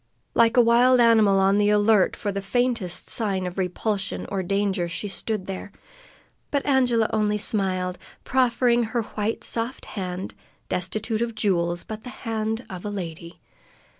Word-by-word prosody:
Like 230 Hz, +1 st, +4 dB
a 245 Hz, -, +8 dB
wild 245 Hz, +2 st, +5 dB
animal 220 Hz, -4 st, +5 dB
on 195 Hz, +1 st, +3 dB
the 205 Hz, 0 st, +3 dB
alert 210 Hz, -1 st, +4 dB
for 205 Hz, -, -3 dB
the 200 Hz, 0 st, -3 dB
faintest 230 Hz, -3 st, -1 dB
sign 195 Hz, -5 st, 0 dB
of 180 Hz, +1 st, -5 dB
repulsion 195 Hz, +2 st, -2 dB
or 195 Hz, -1 st, -1 dB
danger, 195 Hz, -1 st, 0 dB
she 185 Hz, +4 st, -4 dB
stood 205 Hz, 0 st, -3 dB
there, 195 Hz, +1 st, -6 dB, 0.8 s
but 285 Hz, -1 st, -1 dB
Angela 245 Hz, -5 st, +3 dB
only 210 Hz, -1 st, +1 dB
smiled, 185 Hz, -3 st, -1 dB, 0.2 s
proffering 245 Hz, -1 st, +2 dB, 0.2 s
her 235 Hz, -, +1 dB
white, 215 Hz, +1 st, -3 dB
soft 235 Hz, +3 st, -4 dB
hand, 185 Hz, -1 st, -4 dB, 0.4 s
destitute 215 Hz, +5 st, -2 dB
of 235 Hz, -1 st, -2 dB
jewels, 175 Hz, -5 st, 0 dB
but 215 Hz, 0 st, -8 dB
the 250 Hz, -, -7 dB, 0.2 s
hand 225 Hz, +1 st, -2 dB
of 180 Hz, -2 st, -8 dB
a 210 Hz, -, -3 dB
lady. 170 Hz, -4 st, -7 dB
210 Hz, 155 wpm, -24 LUFS, 190-230 Hz, 0.8 s, a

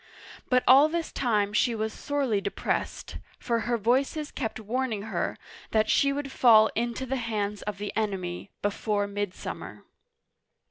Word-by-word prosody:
But 250 Hz, -1 st, +3 dB
all 275 Hz, +4 st, +8 dB
this 335 Hz, 0 st, -2 dB
time 210 Hz, -5 st, 0 dB
she 235 Hz, +2 st, +2 dB
was 220 Hz, 0 st, -2 dB
sorely 275 Hz, -8 st, -1 dB
depressed, -, -, -3 dB, 0.2 s
for 235 Hz, -1 st, -1 dB
her 240 Hz, -, +2 dB
voices 270 Hz, +7 st, 0 dB
kept 225 Hz, -4 st, -4 dB
warning 220 Hz, -1 st, -2 dB
her 220 Hz, -, -2 dB, 0.3 s
that 215 Hz, -1 st, +2 dB
she 280 Hz, -, +4 dB
would 275 Hz, -1 st, -4 dB
fall 220 Hz, -4 st, +6 dB
into 240 Hz, +3 st, -2 dB
the 265 Hz, +1 st, -2 dB
hands 210 Hz, -4 st, -2 dB
of 210 Hz, -1 st, -4 dB
the 205 Hz, 0 st, -5 dB
enemy 195 Hz, -4 st, -3 dB
" -, -, -53 dB
before 205 Hz, 0 st, 0 dB
midsummer." 200 Hz, -2 st, -5 dB
220 Hz, 150 wpm, -27 LUFS, 205-260 Hz, 0.3 s, all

